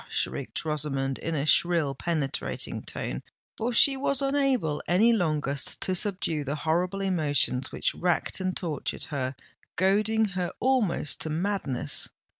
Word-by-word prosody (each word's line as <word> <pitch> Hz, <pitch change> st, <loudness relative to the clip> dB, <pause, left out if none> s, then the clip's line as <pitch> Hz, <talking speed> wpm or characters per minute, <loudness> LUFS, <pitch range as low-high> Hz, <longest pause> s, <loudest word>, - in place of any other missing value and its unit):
shrieked -, -, -3 dB
Rosamond, 135 Hz, -3 st, -1 dB
in 165 Hz, -, -2 dB
a 140 Hz, -1 st, 0 dB
shrill, 165 Hz, -2 st, +3 dB
penetrating 150 Hz, -1 st, -2 dB
tone—for 235 Hz, +2 st, -5 dB
she 275 Hz, +3 st, +5 dB
was 270 Hz, 0 st, +1 dB
unable 275 Hz, -, +1 dB
any 215 Hz, +7 st, +5 dB
longer 155 Hz, -8 st, +1 dB, 0.3 s
to 185 Hz, -, -1 dB
subdue 180 Hz, -5 st, +1 dB
the 140 Hz, +1 st, -2 dB
horrible 175 Hz, +5 st, 0 dB
emotions 150 Hz, -8 st, +1 dB
which -, -, -1 dB
racked 175 Hz, +2 st, 0 dB
and 185 Hz, -1 st, -1 dB
tortured 160 Hz, -7 st, -3 dB
her, 130 Hz, -1 st, -2 dB, 0.4 s
goading 215 Hz, +4 st, +3 dB
her 180 Hz, -2 st, -2 dB
almost 240 Hz, -, +1 dB
to 160 Hz, -, -2 dB
madness. 155 Hz, -, 0 dB
175 Hz, 130 wpm, -27 LUFS, 150-205 Hz, 0.4 s, she